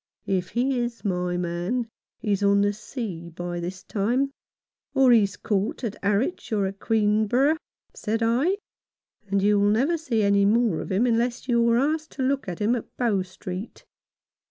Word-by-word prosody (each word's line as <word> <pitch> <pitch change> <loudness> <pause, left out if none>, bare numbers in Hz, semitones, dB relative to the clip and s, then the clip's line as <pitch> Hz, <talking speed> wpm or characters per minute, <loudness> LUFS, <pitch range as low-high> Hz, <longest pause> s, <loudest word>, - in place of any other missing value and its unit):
" - - -54
If 185 -2 -1
he 255 +1 +2
is 240 -1 -4
my 180 -2 0
man, 175 +8 -2 0.3
he's 205 -2 -1
on 200 0 +4
the 205 0 +2
sea 200 -6 -6
by 175 +1 -5
this 185 +2 -6
time, 245 +7 0 0.6
or 265 -2 +6
he's 205 -5 +4
caught 205 +3 -1
at 220 -3 -2
Harwich 210 - 0
or 205 -3 +1
at 195 +1 -5
Oueenborough," 220 +7 +2 0.4
said 225 +1 -2
I, 265 - +2 0.4
" 210 - -44
and 200 0 +1
you'll 205 0 +4
never 275 +11 +2
see 240 -9 0
any 200 0 +4
more 215 -3 +3
of - - -7
him 200 +6 +2
unless 240 +1 0
you're 235 -1 +3
asked 310 +4 0
to 265 - -3
look 275 -2 0
at 175 -2 -4
him 220 +3 +2
at 235 - -5
Bow 225 -6 +1
Street. 185 +2 -7
215 Hz, 175 wpm, -25 LUFS, 195-245 Hz, 0.6 s, or